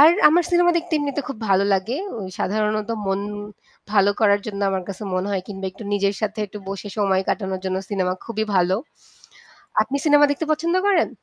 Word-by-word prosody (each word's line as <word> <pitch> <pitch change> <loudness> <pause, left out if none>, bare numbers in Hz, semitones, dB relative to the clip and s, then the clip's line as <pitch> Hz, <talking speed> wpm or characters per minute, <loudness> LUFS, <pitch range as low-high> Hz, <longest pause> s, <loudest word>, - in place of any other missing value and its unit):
আর 300 - +10 0.2
আমার 345 +3 +3
সিনেমা 350 0 +5
দেখতে 340 0 -3
এমনিতে 290 -1 -1
খুব 275 - -6
ভালো 195 0 +4
লাগে। 195 +7 0 0.4
সাধারণত 215 +1 0 0.2
মন 195 0 0 0.7
ভালো 200 -1 +5
করার 205 -2 +4
জন্য 200 -1 -5
আমার 190 -1 -1
কাছে 195 +1 -6
মনে 185 +1 0
হয় 195 -2 -1
কিংবা 195 -1 -6
একটু 195 - -11
নিজের 200 0 +1
সাথে 215 +1 -2
একটু 210 - -9
বসে 200 +1 -5
সময় 195 -2 +2
কাটানোর 190 -2 -1
জন্য 185 0 -1
সিনেমা 185 -3 0
খুবই 220 -2 -2
ভালো। 180 +1 +3 1.1
আপনি 265 +5 -3
সিনেমা 290 -1 +6
দেখতে 285 +3 -1
পছন্দ 330 +3 0
করেন? 380 -5 +3
205 Hz, 180 wpm, -22 LUFS, 195-285 Hz, 1.1 s, আর